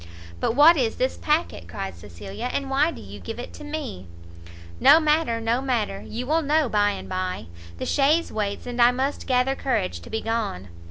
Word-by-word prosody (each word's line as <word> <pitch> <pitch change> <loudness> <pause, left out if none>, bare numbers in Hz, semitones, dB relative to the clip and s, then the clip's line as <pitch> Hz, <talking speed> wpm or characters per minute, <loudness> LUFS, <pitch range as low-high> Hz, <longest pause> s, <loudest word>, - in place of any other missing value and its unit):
"But 225 - 0
what 315 +4 +7
is 235 -5 0
this 255 +1 0
packet?" 300 - -1
cried 95 +3 -5
Cecilia, 95 - -7
"and 275 -1 -3
why 285 +4 +3
do - - -8
you - - -10
give - - -7
it - - -7
to - - -10
me?" 295 - -6 0.7
"No 310 - +8
matter, 305 -6 +1
no 230 +2 0
matter, 230 -7 -1
you 240 +3 -5
will 315 +4 +2
know 300 0 +2
by 205 -2 +2
and 205 - -5
by; 185 - -3 0.3
the - - -4
chaise 300 +4 +2
waits, 205 -2 -3
and 245 0 -2
I 240 - +8
must 265 +3 -2
gather 255 +1 +2
courage 225 -9 -1
to - - -13
be 220 0 -2
gone." 220 - -3
245 Hz, 200 wpm, -24 LUFS, 205-290 Hz, 0.7 s, No